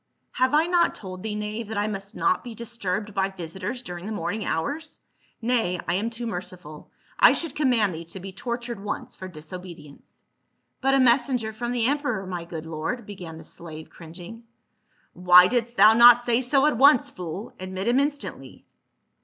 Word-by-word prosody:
" - - -48
Have 260 +3 +4
I 310 +2 +4
not 350 0 +2
told 185 -2 -8
thee, 215 0 -4
knave, 210 +1 -4
that 220 0 -5
I 205 - +1
must 195 -1 -5
not 185 - +1
be 240 -2 -8
disturbed 210 -3 -4
by 195 -1 0
visitors 190 +7 -6
during 175 -2 -7
the - - -4
morning 205 +2 -3
hours? 285 - -3 0.4
Nay, 225 -7 0
I 175 - +1
am 205 +5 0
too 235 +1 -6
merciful, 180 -7 -7 0.3
I - - +8
should 330 -5 -4
command 240 - +2
thee 165 +1 -7
to 180 +3 -9
be 190 +1 -8
tortured 235 0 -5
once 205 - -5
for 185 - -8
disobedience." 165 -2 -11 0.3
" - - -49
But 270 0 +3
a - - +4
messenger 240 -2 +2
from 240 +2 -4
the 240 -2 0
emperor, 255 -7 -1
my 175 -2 -5
good 165 -2 -7
lord," 165 +10 -4
began 180 -6 -9
the 160 - -11
slave 160 -1 -10
cringing, 175 +8 -11 0.4
*' - - -43 0.2
Why 180 0 +7
didst 240 +2 -1
thou 215 +3 +8
not 240 +1 +9
say 240 0 0
so 270 +2 +3
at 300 -5 +2
once, 280 -2 +6
fool. 180 +4 -7
Admit 185 +2 -5
him 245 +3 +3
instantly. 285 0 -4
210 Hz, 190 wpm, -25 LUFS, 180-240 Hz, 0.4 s, not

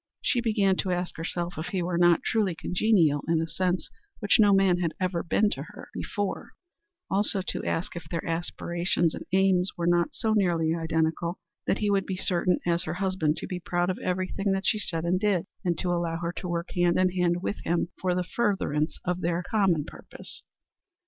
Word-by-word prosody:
She 245 - +2
began 205 -5 +2
to 190 - -1
ask 180 0 -2
herself 170 +1 -2
if 160 - -4
he 185 -3 -1
were 175 0 -1
not 175 -1 +5
truly 205 -6 +1
congenial 175 -6 +2
in 165 -1 +2
a 165 - 0
sense 180 +1 -1 0.3
which 205 0 +2
no 205 -2 +6
man 195 -2 +4
had 165 -3 -1
ever 185 -2 0
been 205 +4 +2
to - - -3
her - - -10
before; 205 -2 -4 0.6
also, 195 0 +2
to - - -3
ask 165 - -2
if 165 -3 -8
their 165 -1 -3
aspirations 170 0 0
and - - -8
aims 190 -1 +3
were 170 - -1
not 175 -1 +2
so 220 -1 0
nearly 170 -6 +2
identical 165 +1 -1 0.3
that - - +2
he 210 -1 0
would 195 -1 +1
be 190 - -3
certain 180 -1 +1
as 170 0 +1
her - - -3
husband 185 -5 0
to - - -5
be 180 -2 -4
proud 175 +1 0
of 185 - -6
everything 185 +2 -1
she 215 - +1
did 165 -4 -2
and 180 +2 +1
said, 200 -5 +2 0.2
and 175 -3 0
to 180 - -1
allow 170 -1 -1
her 170 0 -2
to 180 - -4
work 170 0 -3
hand 175 -1 +2
in 185 0 +4
hand 175 -1 0
with 205 - -2
him 170 +1 0
for 180 -1 +1
the 180 - 0
furtherance 180 -8 0
of 180 0 -1
their 170 +1 0
common 190 -7 +2
purpose. - - -9
180 Hz, 200 wpm, -27 LUFS, 170-190 Hz, 0.6 s, no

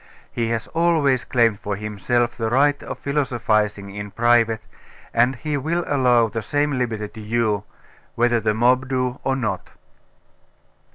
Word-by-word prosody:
He 115 -1 -1
has 115 0 -2
always 160 -6 +2
claimed 115 -4 +2
for 100 -1 -3
himself 105 +4 -1
the 115 -2 -2
right 145 +4 +3
of - - -6
philosophising 110 -8 -1
in 105 0 -6
private, 115 0 +2 0.5
and 120 +3 +3
he 150 +3 -3
will 165 +5 -1
allow 125 -4 +3
the 115 +1 -4
same 145 +4 0
liberty 110 -4 -2
to 110 - -11
you' 105 -2 0 0.5
whether 120 0 +2
the 105 -1 0
mob 125 +3 +2
do 125 -1 -1
or 135 - +1
not. 110 -8 -3
120 Hz, 150 wpm, -22 LUFS, 110-130 Hz, 0.5 s, right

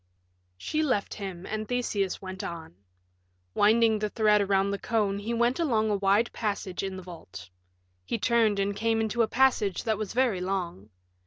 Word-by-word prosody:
She 305 - -2
left 255 -10 0
him, 190 -3 -7
and 215 0 -4
Theseus 210 -6 -1
went 190 -1 -7
on. 165 - -7 0.8
Winding 220 - +4
the 210 0 -1
thread 210 -1 +3
around 195 0 +1
the 200 - -3
cone 205 -4 0
he 215 +3 -4
went 235 +4 +1
along 220 -9 +1
a - - +2
wide 200 +4 +2
passage 200 -4 -3
in 190 -1 -4
the 185 - -8
vault. 130 - -11 0.5
He 90 - -2
turned 225 -2 +2
and 200 0 0
came 225 +2 +1
into 225 +1 0
a 225 - +3
passage 245 -6 +2
that 220 -3 -1
was 215 -2 -4
very 240 -7 +1
long. 180 - -3
205 Hz, 175 wpm, -27 LUFS, 195-225 Hz, 0.8 s, Winding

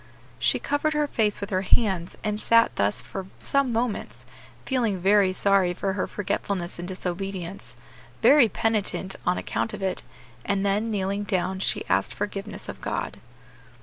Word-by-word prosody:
She - - +3
covered 290 +2 0
her 300 0 +2
face 215 -7 0
with 200 +1 -5
her 185 0 +1
hands, 190 -3 +1
and 210 -1 -1
sat 230 0 +4
thus 105 +4 +1
for 190 -1 -6
some 275 -2 +2
moments, 230 -1 -2 0.4
feeling 235 -7 +1
very 195 +1 +4
sorry 185 -2 +2
for 195 +1 -1
her 190 - -1
forgetfulness 190 -3 -3
and 175 - -5
disobedience; 185 0 -5 0.5
very 275 -5 +7
penitent 210 -3 0
on 180 - +3
account 115 +1 -2
of - - -7
it; 190 -1 -1 0.4
and 200 0 0
then, 205 +3 +1
kneeling 200 -1 -1
down, 190 -2 -1
she - - -1
asked 95 +1 +1
forgiveness 205 0 -4
of - - -7
God. - - -3
200 Hz, 155 wpm, -26 LUFS, 185-215 Hz, 0.5 s, very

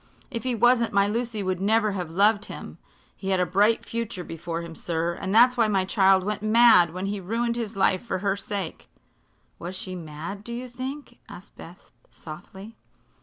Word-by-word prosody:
"If 230 -3 -3
he 255 -2 -1
wasn't 235 0 +3
my 200 0 +4
Lucy 225 -1 -2
would 185 -1 -2
never 215 +1 +2
have 180 -4 -4
loved 205 +4 +3
him. - - -9 0.4
He 195 - -5
had 190 -1 +2
a 180 - +3
bright 205 +6 +2
future 230 -5 -4
before 165 0 -5
him, 165 -1 -8
sir, 170 +1 -2
and 190 +2 -5
that's 245 +4 +6
why 230 -2 +4
my 195 -3 +1
child 190 -1 +4
went 210 +1 -3
mad 215 -6 +6
when 185 +3 -4
he 200 +1 -2
ruined 230 +5 -1
his 230 -2 -4
life 190 0 +2
for 210 -5 -2
her 195 +1 0
sake." 200 -3 -5 0.7
"Was 175 +2 -6
she 185 0 -4
mad, 170 +4 -7
do 235 - -7
you 250 +2 -5
think?" 260 +4 -7
asked 190 +3 -12
Beth, 175 +3 -13 0.2
softly. 190 +7 -11
200 Hz, 190 wpm, -25 LUFS, 185-230 Hz, 0.7 s, that's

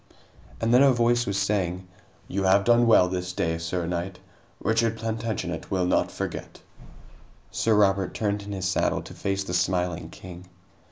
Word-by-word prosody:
And 115 +1 +1
then 125 - +6
a 140 -1 +6
voice 120 0 +2
was 100 0 -1
saying: 95 -3 -1 0.4
"You 100 - -2
have 95 +1 +4
done 120 +1 +4
well 100 -5 +6
this 90 0 -4
day, 80 -2 -1
sir 85 +1 -3
knight. 90 +2 -3 0.4
Richard 115 0 +1
Plantagenet 110 -6 -4
will 95 -2 0
not 90 - +1
forget." - - -6 0.9
Sir 110 -1 +1
Robert 95 -2 +2
turned 105 -1 -1
in 100 0 -8
his 95 -2 -2
saddle 95 - 0
to - - -11
face 95 0 -2
the 90 - -6
smiling 90 -2 0
king. 90 +1 -11
95 Hz, 165 wpm, -25 LUFS, 90-110 Hz, 0.9 s, then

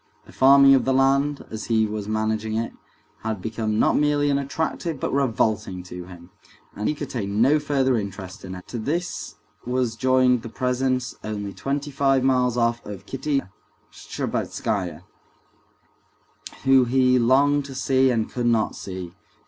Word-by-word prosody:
The - - -15
farming 135 +1 +6
of 135 - +4
the 135 - +1
land, 140 +2 +2
as 110 -1 -5
he 110 -1 +2
was 105 -1 -4
managing 110 0 -1
it, 115 +1 -3 0.5
had 110 -2 -3
become 110 +1 -2
not - - +3
merely 145 -1 +2
unattractive 140 +2 -2
but - - -2
revolting 110 -8 0
to 90 -1 -8
him, 90 0 -13 0.4
and 105 - -2
he 150 - -1
could 145 -1 -6
take 105 -6 -3
no 125 +9 +3
further 135 -3 +1
interest 95 -2 -7
in 95 0 -7
it. 90 - -11
To 120 - -4
this 170 +10 -3 0.3
now 125 - -4
was 125 -3 0
joined 130 0 +3
the 115 - -8
presence, 125 0 -1
only 105 -2 -4
twenty 145 +5 -3
five 135 -2 +2
miles 125 -2 +2
off, 115 0 +1
of 100 -1 -9
Kitty 135 +2 -1 0.5
Shtcherbatskaya, 90 -5 -3 1.6
whom 135 -2 +5
he 125 0 +3
longed 140 +4 +3
to 135 -1 -9
see 130 0 +2
and 115 -3 0
could 120 -1 -2
not 115 -2 +1
see. 95 -2 -7
125 Hz, 160 wpm, -23 LUFS, 110-135 Hz, 1.6 s, farming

